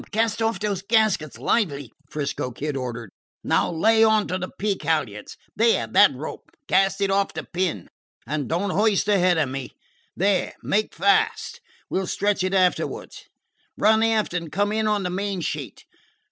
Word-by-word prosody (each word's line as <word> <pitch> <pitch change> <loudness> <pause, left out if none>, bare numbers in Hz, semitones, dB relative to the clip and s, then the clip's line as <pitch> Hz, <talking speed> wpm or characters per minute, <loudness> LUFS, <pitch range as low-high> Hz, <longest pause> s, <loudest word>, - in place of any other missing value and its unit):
Cast 225 +1 0
off 225 -4 0
those 205 -2 -2
gaskets 205 - +1
lively!" 145 - -1 0.2
'Frisco 145 -3 -3
Kid 145 +4 -4
ordered. 120 -5 -5 0.3
"Now - - +1
lay 220 +7 +4
on 220 -1 +3
to 185 - -2
the 185 - -4
peak 205 -1 -1
halyards 130 -11 -2 0.2
there, 230 +1 +3
that - - +5
rope - - -8 0.2
cast 195 +1 +2
it 195 -1 +1
off 195 0 0
the - - -4
pin. 175 - -3 0.4
And 145 +1 -3
don't 185 +4 -1
hoist 210 0 +2
ahead 185 -4 +3
of 150 -4 +1
me. 135 0 -6 0.4
There! 195 +1 +1
Make 215 +2 0
fast! 440 - +1 0.3
We - - -1
'll 190 - -3
stretch 200 0 0
it 185 +1 0
afterwards. 185 -1 -1 0.5
Run 220 +1 +4
aft 225 -4 +1
and 170 -3 -4
come 205 +1 0
in 220 0 0
on 210 -2 +1
the 180 - -2
main 195 +1 -2
sheet! - - -5
195 Hz, 170 wpm, -23 LUFS, 160-215 Hz, 0.5 s, that